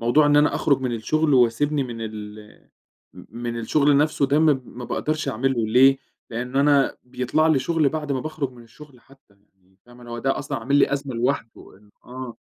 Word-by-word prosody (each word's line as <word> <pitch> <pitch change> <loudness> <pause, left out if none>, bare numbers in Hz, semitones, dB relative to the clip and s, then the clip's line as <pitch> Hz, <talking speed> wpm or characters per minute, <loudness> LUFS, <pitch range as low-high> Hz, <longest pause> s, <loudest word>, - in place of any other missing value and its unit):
موضوع 120 +6 +3
إن 145 0 +4
أنا 150 0 +3
أخرُج 140 -3 +1
من 130 -2 -2
الشُّغل، 155 +6 0
واسيبني 135 +4 +2
من 120 -3 -7
ال 105 -1 -9 0.5
م - - -13 0.2
من 120 -1 -3
الشُّغل 140 +5 +2
نفْسه 150 -1 +2
ده 145 +2 +2
م 160 - +3 0.2
ما 120 +1 -10
باقدرش 155 +3 -2
أعملُه 120 -1 -1
ليه؟ 135 +4 +5 0.3
لإن 125 +3 -5
أنا 140 0 +3
بيطلع 130 +5 0
لي 155 -4 +3
شُغل 160 -1 +1
بعد 150 -1 -4
ما 135 - -1
باخرج 155 -1 -4
من 120 -1 -15
الشُّغل 130 +3 -16
حتّى 135 -4 -24 0.3
يعني، 95 +1 -33
فاهمة، 120 0 -15
هو 120 - -5
ده 135 +2 -1
أصلًا - - -4
عامِل 125 +5 -1
لي 140 0 +3
أزمة 140 -2 -4
لوحدُه 115 -4 -3
إن 105 +1 -24 0.2
آه. 125 -1 -8
130 Hz, 195 wpm, -23 LUFS, 120-145 Hz, 0.5 s, ليه